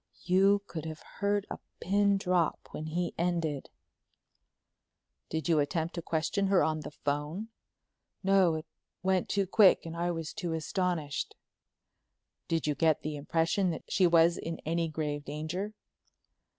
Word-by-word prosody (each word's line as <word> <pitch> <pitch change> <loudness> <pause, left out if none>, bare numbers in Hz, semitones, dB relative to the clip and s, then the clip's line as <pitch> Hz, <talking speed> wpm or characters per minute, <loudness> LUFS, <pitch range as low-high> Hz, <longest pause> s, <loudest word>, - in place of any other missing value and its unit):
You 195 +2 +4
could 160 -5 -6
have 160 0 -7 0.2
heard 205 0 +1
a - - -4 0.2
pin 200 +1 +3
drop 180 -4 0
when 155 - -5
he 175 +2 -2
ended. 165 -5 -1 1.6
"Did 160 +1 -2
you 165 -3 +4
attempt 160 +3 -1
to 170 - -4
question 165 +5 0
her 195 -1 +4
on 155 0 0
the 150 - -6
phone?" 150 +9 -3 0.7
"No, 190 -4 +4
it 155 - -5
all - - -55 0.3
went 185 -1 +1
too 200 -1 +1
quick 190 -1 +5
and 165 0 -6
I 170 +1 0
was 165 -2 -3
too 175 -5 -3
astonished." 160 -2 -2 1.1
"Did 165 -1 0
you 150 - +2
get 160 0 +2
the 150 0 -3
impression 165 +6 +1
that 160 - -4
she 185 -3 +4
was 170 0 +5
in 165 0 -4
any 165 +1 0
grave 150 -2 -3
danger?" 175 +9 -4
170 Hz, 150 wpm, -30 LUFS, 155-190 Hz, 1.6 s, quick